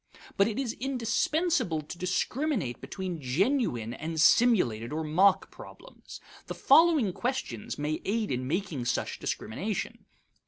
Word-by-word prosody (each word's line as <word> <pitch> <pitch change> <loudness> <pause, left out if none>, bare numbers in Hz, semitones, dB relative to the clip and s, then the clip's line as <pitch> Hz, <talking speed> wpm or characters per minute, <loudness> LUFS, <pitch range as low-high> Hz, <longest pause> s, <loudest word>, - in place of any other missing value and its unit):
But 195 - +3
it 220 - -3
is 265 -4 -2
indispensable 270 - 0
to 150 +3 -9
discriminate 185 - -1
between 185 -4 -5
genuine 130 - 0
and 160 +4 -5
simulated 150 - +3
or 160 +1 -2
mock 180 +6 +3
problems. - - -12 0.3
The - - -5
following 315 - +4
questions 240 - -4
may 150 +1 -2
aid 215 -1 -1
in 130 0 -2
making 160 -5 -2
such - - -2
discrimination. 195 - -4
185 Hz, 125 wpm, -28 LUFS, 150-240 Hz, 0.3 s, following